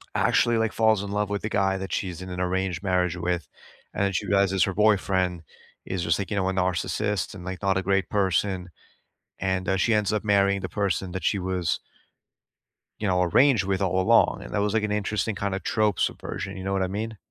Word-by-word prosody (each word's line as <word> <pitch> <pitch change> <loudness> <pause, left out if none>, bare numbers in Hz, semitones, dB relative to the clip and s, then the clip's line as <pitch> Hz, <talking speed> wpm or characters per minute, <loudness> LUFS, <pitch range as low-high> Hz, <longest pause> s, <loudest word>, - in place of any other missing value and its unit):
Actually, 120 0 +3
like, 110 -1 0
falls 110 -3 +3
in 100 - -5
love 105 0 -1
with 100 0 -2
the 105 - -3
guy 95 -2 +1
that 95 0 -5
she's 90 -2 -3
in 95 - -7
an 90 0 -5
arranged 90 -1 -1
marriage 90 -2 +1
with, 90 -1 -2 0.5
and 100 -1 0
she 105 - -1
realizes 100 0 +3
her 100 - 0
boyfriend 95 -4 +2 0.4
is 95 -2 -3
just, 85 +1 +1
like, 100 - -4
you 100 - -1
know, 95 -1 +1
a - - -1
narcissist, 95 +2 -1
and, 90 -3 -10
like, 95 0 -5
not 95 -1 +1
a 95 - -1
great 95 +1 +1
person, 95 -2 0 0.7
and, 95 0 -1
uh, 95 - +2
she 115 +4 +2
ends 105 -2 +1
up 105 - -1
marrying 100 -2 +2
the 95 - -4
person 95 -3 -1
that 95 -1 -5
she 100 - +1
was 90 -2 -1 1.2
you 105 - -1
know, 90 -1 +2
arranged 110 - +4
with 95 0 -1
all 95 -1 +1
along, - - +4
and - - -10
that - - 0
was, 105 0 0
like, 110 - +2
an 105 - -1
interesting, 105 +1 -1
kinda, 100 -1 -2
trope 105 0 0
subversion, 95 0 -3
you 95 - -6
know 95 - -2
what 95 - 0
I 95 - +1
mean? 110 +3 -4
95 Hz, 220 wpm, -25 LUFS, 95-105 Hz, 1.2 s, arranged